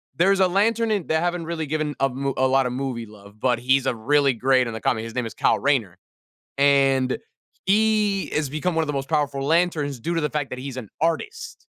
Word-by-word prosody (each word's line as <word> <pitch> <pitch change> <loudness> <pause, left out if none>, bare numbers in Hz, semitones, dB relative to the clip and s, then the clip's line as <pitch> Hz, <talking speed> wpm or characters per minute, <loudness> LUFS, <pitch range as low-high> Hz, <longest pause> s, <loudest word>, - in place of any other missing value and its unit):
There's 195 +3 +3
a 190 - +5
lantern 220 +4 +1
in 200 -6 -1
they 160 - +1
haven't 175 0 -1
really 165 -2 -3
given 155 0 -2
a 135 - +3 0.3
a 130 - +3
lot 135 0 +3
of 125 - -2
movie 125 -3 -3
love, 105 0 -16
but 125 -2 +1
he's 130 +2 +2
a - - +1
really 140 +4 +2
great 130 +2 +2
in 115 - -5
the 110 - -6
comic, 110 -2 0
his 115 0 -7
name 125 - -1
is - - -9
Kyle - - +2
Rayner, 130 -11 0 0.6
and, 135 -2 +3 0.5
he 210 -1 +2
is 150 -3 0
become 160 +4 -2
one 165 - +2
of 155 - -5
the 150 - -2
most 135 0 -3
powerful 145 -3 0
lanterns 155 -2 +1
due 170 - -2
to - - +1
the 150 - 0
fact 150 -3 -3
that 125 - -6
he's 135 -1 -6
an 120 -6 -7
artist, 440 - -3
145 Hz, 230 wpm, -23 LUFS, 130-170 Hz, 0.6 s, a